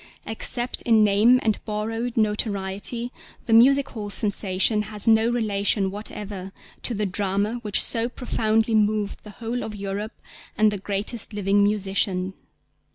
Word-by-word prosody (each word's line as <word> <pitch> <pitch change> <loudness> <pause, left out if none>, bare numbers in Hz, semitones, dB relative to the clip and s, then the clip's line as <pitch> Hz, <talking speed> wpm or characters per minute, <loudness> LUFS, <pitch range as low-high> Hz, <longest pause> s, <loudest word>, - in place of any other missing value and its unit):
Except 240 +3 -2
in 225 -2 +4
'name 210 +5 +5
and 220 -2 0
borrowed 225 +3 -3
notoriety' 210 +2 -1 0.3
the 225 - +1
music 270 +4 +6
hall 210 -4 -6
sensation 205 0 +1
has 210 +1 +1
no 225 +1 +5
relation 205 -4 +1
whatever 200 -2 -7 0.3
to 240 - -2
the 210 +1 -1
drama 200 +4 -1
which 210 -4 +1
so 230 +1 -1
profoundly 225 -3 0
moved 210 -1 +1
the 210 - -11
whole 240 +1 -3
of 215 - -6
Europe 200 +2 -5 0.4
and 215 0 +4
the 205 - -4
greatest 205 +4 -2
living 200 0 +2
musician. 195 -2 0
210 Hz, 140 wpm, -24 LUFS, 200-225 Hz, 0.4 s, music